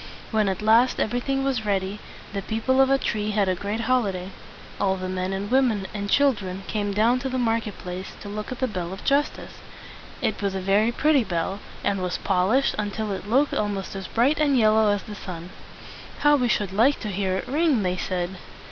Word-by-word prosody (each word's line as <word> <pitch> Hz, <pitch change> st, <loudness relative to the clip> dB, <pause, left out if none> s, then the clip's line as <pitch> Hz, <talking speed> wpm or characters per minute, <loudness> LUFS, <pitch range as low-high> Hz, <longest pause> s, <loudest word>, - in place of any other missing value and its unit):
When 215 Hz, -3 st, +2 dB
at 190 Hz, +2 st, -3 dB
last 230 Hz, +4 st, +4 dB
everything 270 Hz, +4 st, 0 dB
was 265 Hz, -5 st, 0 dB
ready, 200 Hz, 0 st, -1 dB, 0.3 s
the 200 Hz, -, -2 dB
people 230 Hz, +6 st, +1 dB
of 265 Hz, -, +4 dB
Atri 215 Hz, -6 st, 0 dB
had 205 Hz, -2 st, +1 dB
a 185 Hz, -, +2 dB
great 205 Hz, +5 st, -3 dB
holiday. 200 Hz, -6 st, 0 dB, 0.5 s
All 190 Hz, -1 st, +2 dB
the 185 Hz, 0 st, -4 dB
men 185 Hz, 0 st, -2 dB
and 195 Hz, +3 st, -4 dB
women 245 Hz, -7 st, +2 dB
and 200 Hz, -1 st, -4 dB
children 205 Hz, -10 st, +1 dB
came 205 Hz, -1 st, -1 dB
down 225 Hz, +5 st, +3 dB
to 265 Hz, -, -3 dB
the 260 Hz, -, -2 dB
market 225 Hz, -4 st, 0 dB
place 180 Hz, +1 st, -7 dB
to -, -, -8 dB
look 210 Hz, +3 st, -5 dB
at 255 Hz, -, -4 dB
the 260 Hz, -, 0 dB
bell 185 Hz, -5 st, -4 dB
of 195 Hz, -, -9 dB
justice. 285 Hz, +2 st, 0 dB, 0.6 s
It -, -, -1 dB
was 200 Hz, -1 st, -1 dB
a -, -, -1 dB
very 200 Hz, +4 st, +2 dB
pretty 285 Hz, +1 st, +3 dB
bell, 190 Hz, 0 st, -2 dB, 0.2 s
and 195 Hz, -2 st, 0 dB
was, 180 Hz, -1 st, -1 dB
pol 185 Hz, -1 st, +1 dB
ished 265 Hz, +4 st, +3 dB
until 210 Hz, 0 st, -2 dB
it 195 Hz, +1 st, -5 dB
looked 275 Hz, +5 st, +3 dB
almost 205 Hz, -2 st, -2 dB
as 195 Hz, -1 st, -5 dB
bright 265 Hz, +7 st, +2 dB
and 285 Hz, -3 st, +3 dB
yellow 220 Hz, -1 st, +4 dB
as 205 Hz, -1 st, 0 dB
the 210 Hz, -, -8 dB
sun. 180 Hz, -3 st, -8 dB, 0.7 s
"How 295 Hz, 0 st, +6 dB
we 250 Hz, -4 st, +1 dB
should 205 Hz, -4 st, 0 dB
like 245 Hz, +8 st, +3 dB
to 215 Hz, -, -3 dB
hear 190 Hz, -1 st, -1 dB
it -, -, -5 dB
ring!" 290 Hz, -5 st, +2 dB
they 180 Hz, 0 st, 0 dB
said. 185 Hz, 0 st, -3 dB
210 Hz, 210 wpm, -24 LUFS, 190-245 Hz, 0.7 s, How